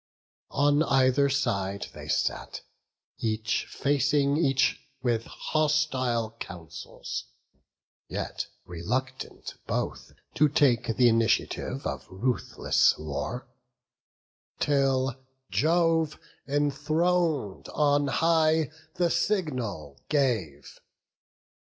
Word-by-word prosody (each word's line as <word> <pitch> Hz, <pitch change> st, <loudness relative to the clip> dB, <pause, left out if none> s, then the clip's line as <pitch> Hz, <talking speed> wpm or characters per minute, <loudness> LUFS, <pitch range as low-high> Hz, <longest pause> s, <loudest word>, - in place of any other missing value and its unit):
On 145 Hz, +1 st, +4 dB
either 135 Hz, -1 st, +3 dB
side 100 Hz, -8 st, -1 dB
they -, -, -9 dB
sat, -, -, -1 dB, 0.6 s
each 110 Hz, -1 st, -1 dB
facing 140 Hz, 0 st, +2 dB
each 135 Hz, -4 st, +2 dB, 0.2 s
With 115 Hz, -2 st, +1 dB
hostile 135 Hz, -7 st, 0 dB
counsels; 85 Hz, -2 st, -7 dB, 0.8 s
yet -, -, -4 dB, 0.2 s
reluctant 130 Hz, +10 st, -4 dB
both -, -, -3 dB, 0.2 s
To 150 Hz, +1 st, +4 dB
take 135 Hz, -5 st, +3 dB
th' 115 Hz, -, -3 dB
initiative 115 Hz, -2 st, +2 dB
of -, -, -4 dB
ruthless 120 Hz, +7 st, +1 dB
war; 75 Hz, -3 st, -4 dB, 1.1 s
Till 135 Hz, -2 st, +2 dB, 0.4 s
Jove, 165 Hz, -1 st, +2 dB, 0.3 s
enthron'd 145 Hz, -, 0 dB
on 145 Hz, -1 st, +2 dB
high, 160 Hz, 0 st, +3 dB, 0.2 s
the 175 Hz, -2 st, +2 dB
signal 125 Hz, -, -1 dB
gave. 115 Hz, -, -1 dB
135 Hz, 80 wpm, -27 LUFS, 115-150 Hz, 1.1 s, On